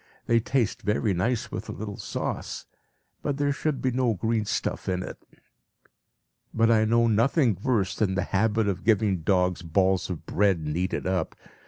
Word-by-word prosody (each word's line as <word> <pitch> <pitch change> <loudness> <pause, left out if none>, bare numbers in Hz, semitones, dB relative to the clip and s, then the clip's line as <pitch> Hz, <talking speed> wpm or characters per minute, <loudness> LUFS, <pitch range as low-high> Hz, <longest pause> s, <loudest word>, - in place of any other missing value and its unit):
They 115 0 +3
taste 115 -1 0
very 105 -1 +1
nice 110 +7 -1
with - - -5
a - - -2
little 105 0 -6
sauce, - - -4 0.6
but 145 -2 -2
there 145 0 +1
should 140 0 -2
be 130 - +2
no 125 -3 +1
green 110 +3 0
stuff 100 - -2
in 90 0 -1
it. - - -9 1.3
But 115 +1 +3
I 110 -1 +4
know 115 +1 +3
nothing 115 - +3
worse 105 -7 +1
than 95 -3 0
the - - 0
habit 110 +2 +1
of 95 -4 -2
giving 105 -3 +2
dogs 90 0 +1
balls 95 +3 +1
of 90 -4 -5
bread 95 -4 +1
kneaded 90 +5 -2
up. 90 -3 -1
105 Hz, 170 wpm, -26 LUFS, 95-115 Hz, 1.3 s, I